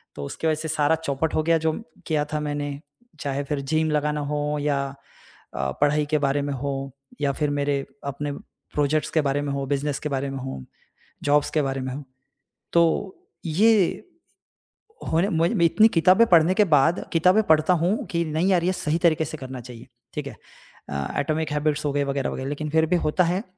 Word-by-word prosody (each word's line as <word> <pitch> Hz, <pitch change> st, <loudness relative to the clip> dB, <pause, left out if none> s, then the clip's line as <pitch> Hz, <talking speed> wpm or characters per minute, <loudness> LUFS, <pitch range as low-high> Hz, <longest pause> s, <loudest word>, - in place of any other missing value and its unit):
तो 70 Hz, -, -6 dB
उसके 160 Hz, -, -3 dB
वजह 155 Hz, -, +2 dB
से 155 Hz, +1 st, -5 dB
सारा 155 Hz, 0 st, +2 dB
चौपट 160 Hz, 0 st, -2 dB
हो 155 Hz, -, +2 dB
गया 165 Hz, +1 st, +3 dB
जो 160 Hz, 0 st, +1 dB, 0.4 s
किया 150 Hz, -2 st, +1 dB
था 150 Hz, -, 0 dB
मैंने, 145 Hz, -1 st, -3 dB, 0.4 s
चाहे 140 Hz, 0 st, -2 dB
फ़िर 145 Hz, 0 st, -3 dB
जिम 155 Hz, +3 st, 0 dB
लगाना 150 Hz, 0 st, 0 dB
हो 150 Hz, 0 st, -1 dB
या 145 Hz, -1 st, +1 dB, 0.8 s
अ, 65 Hz, -, -1 dB
पढ़ाई 150 Hz, +1 st, +3 dB
के 155 Hz, -, +4 dB
बारे 140 Hz, 0 st, +1 dB
में 140 Hz, 0 st, -2 dB
हो 135 Hz, 0 st, -4 dB, 0.3 s
या 140 Hz, -1 st, +2 dB
फ़िर 150 Hz, +1 st, -1 dB
मेरे 140 Hz, -1 st, -1 dB, 0.2 s
अपने 145 Hz, +1 st, -3 dB, 0.4 s
प्रोजेक्ट्स 150 Hz, +1 st, +1 dB
के 160 Hz, -, +2 dB
बारे 140 Hz, 0 st, 0 dB
में 145 Hz, -1 st, -3 dB
हो, 140 Hz, 0 st, -2 dB
बिज़नेस 140 Hz, +1 st, -1 dB
के 150 Hz, -, -4 dB
बारे 140 Hz, 0 st, -2 dB
में 135 Hz, -, -5 dB
हो, 130 Hz, -, -6 dB, 0.6 s
जॉब्स 145 Hz, 0 st, +3 dB
के -, -, +4 dB
बारे 135 Hz, -1 st, -2 dB
में 130 Hz, 0 st, -4 dB
हो। 145 Hz, +2 st, -6 dB, 0.7 s
तो 170 Hz, +3 st, +2 dB, 0.3 s
ये 200 Hz, +4 st, +3 dB, 1.1 s
होने 170 Hz, +5 st, +2 dB
मैं 165 Hz, -2 st, +2 dB
मैं 170 Hz, -4 st, +3 dB
इतनी 215 Hz, +6 st, +5 dB
किताबें 185 Hz, +3 st, +5 dB
पढ़ने 170 Hz, 0 st, +5 dB
के 210 Hz, -, +5 dB
बाद 150 Hz, +5 st, +4 dB
किताबें 180 Hz, +6 st, +4 dB
पढ़ता 160 Hz, -1 st, +4 dB
हूँ 180 Hz, +5 st, 0 dB
कि 170 Hz, -3 st, 0 dB
नहीं 160 Hz, +3 st, 0 dB
यार 180 Hz, -3 st, +3 dB
ये 185 Hz, -, +2 dB
सही 155 Hz, -3 st, -1 dB
तरीके 160 Hz, -1 st, +3 dB
से 155 Hz, -, -6 dB
करना 130 Hz, -2 st, -7 dB
चाहिए, 120 Hz, 0 st, -11 dB, 0.3 s
ठीक -, -, -4 dB
है। -, -, -8 dB, 0.5 s
अ, 70 Hz, -, -3 dB
एटॉमिक 155 Hz, +2 st, -1 dB
हैबिट्स 150 Hz, 0 st, 0 dB
हो 145 Hz, -, +1 dB
गए 145 Hz, 0 st, +1 dB
वगैरह-वगैरह 135 Hz, -1 st, -2 dB
लेकिन 150 Hz, +1 st, -4 dB
फ़िर 160 Hz, +1 st, +3 dB
भी 180 Hz, -, +3 dB
होता 155 Hz, +4 st, +2 dB
है, 180 Hz, +4 st, 0 dB
150 Hz, 200 wpm, -24 LUFS, 140-160 Hz, 1.1 s, इतनी